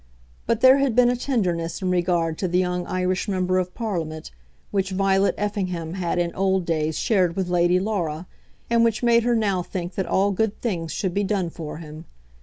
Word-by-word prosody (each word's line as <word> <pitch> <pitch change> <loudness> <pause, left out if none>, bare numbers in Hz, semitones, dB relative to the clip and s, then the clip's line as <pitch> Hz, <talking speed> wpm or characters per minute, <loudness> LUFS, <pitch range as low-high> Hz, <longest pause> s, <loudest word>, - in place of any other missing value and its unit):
But 230 -1 +1
there 260 +1 +7
had 275 -5 +1
been 245 0 +5
a - - 0
tenderness 180 - -1
in 185 -1 -1
regard 175 -3 0
to 185 - 0
the 180 +1 0
young 180 -1 -1
Irish 185 +1 -1
Member 185 -2 +1
of 180 0 -4
Parliament, 165 -9 -4 0.4
which 195 -1 0
Violet 195 +1 +2
Effingham 185 -6 -3
had 180 -2 -2
in 175 -1 0
old 190 -1 +1
days 155 -2 -1
shared 185 -6 +1
with 190 -2 -2
Lady 175 0 +3
Laura, 180 -5 -2 0.4
and 230 0 +3
which 230 0 +1
made 235 -1 +5
her 240 +1 +1
now 200 -5 +1
think 175 0 -5
that 190 - -2
all 200 +2 +2
good 215 +2 -1
things 170 -9 -3
should 190 -4 -2
be 205 - 0
done 190 -4 -1
for 160 -3 -7
him. 155 0 -10
185 Hz, 200 wpm, -23 LUFS, 175-205 Hz, 0.4 s, there